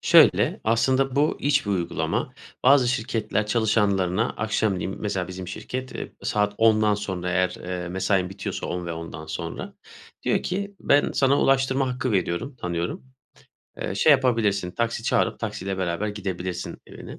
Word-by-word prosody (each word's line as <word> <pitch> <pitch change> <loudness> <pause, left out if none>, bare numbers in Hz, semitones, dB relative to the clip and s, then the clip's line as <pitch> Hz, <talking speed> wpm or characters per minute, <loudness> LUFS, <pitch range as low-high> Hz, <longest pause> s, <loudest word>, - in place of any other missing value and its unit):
Şöyle, - - +5
aslında 130 +4 +2
bu 150 +2 +2
iç 145 -3 +2
bir - - -1
uygulama. 85 -4 -1 0.3
Bazı 130 -1 +6
şirketler 110 -3 -1
çalışanlarına 105 -2 +2
akşam 105 -3 0
diyeyim 95 - -4
mesela 95 -4 -2
bizim 95 -1 -7
şirket, 130 +7 -5
eee, - - -6
saat 105 0 0
10'dan 110 -2 +4
sonra 95 -3 -3
eğer, 90 0 +1
eee, 90 -1 -4
mesain 95 0 0
bitiyorsa 95 0 -5
10.00 90 0 -4
ve 85 - -3
10:00'dan 80 -1 -7
sonra 85 +1 -5 0.5
diyor - - +1
ki 200 +2 -3
ben 145 0 +3
sana 135 +1 +3
ulaştırma 135 0 +2
hakkı 125 -1 -2
veriyorum, 95 +7 -1
tanıyorum. 85 -1 -3 0.8
Eee, - - -3
şey 150 +10 +5
yapabilirsin, 115 -8 +2
taksi 115 +4 -2
çağırıp - - +1
taksiyle 95 0 -4
beraber 95 +3 -1
gidebilirsin 95 -3 -4
evine. - - -10
105 Hz, 150 wpm, -25 LUFS, 90-125 Hz, 0.8 s, Bazı